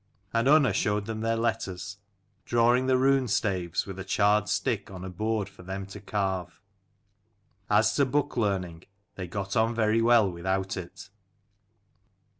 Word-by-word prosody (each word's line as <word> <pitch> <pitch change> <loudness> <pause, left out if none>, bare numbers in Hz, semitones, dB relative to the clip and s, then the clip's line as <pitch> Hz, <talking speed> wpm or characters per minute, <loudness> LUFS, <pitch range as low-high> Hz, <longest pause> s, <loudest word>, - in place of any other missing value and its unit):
And 115 +2 +1
Unna 140 -6 +5
showed 105 +1 0
them 110 0 -5
their 115 0 0
letters, 100 -4 -3 0.5
drawing 120 +2 +2
the 130 -1 +4
runestaves 110 -10 +1
with 95 -1 -8
a - - -4
charred 105 +2 +2
stick 115 -7 -1
on 95 -1 -8
a 95 - -6
board 110 +1 -1
for 100 - -15
them 95 +2 -6
to 100 +2 -10
carve. 95 -3 -3 1.1
As 105 +1 +3
to 140 - +4
book 145 +2 -1
learning, 95 -7 -2 0.3
they 95 -2 -6
got 100 +2 -4
on 115 +1 +2
very 110 0 +2
well 115 -2 +5
without 95 +2 -2
it. 90 -3 -9
105 Hz, 150 wpm, -27 LUFS, 95-115 Hz, 1.1 s, Unna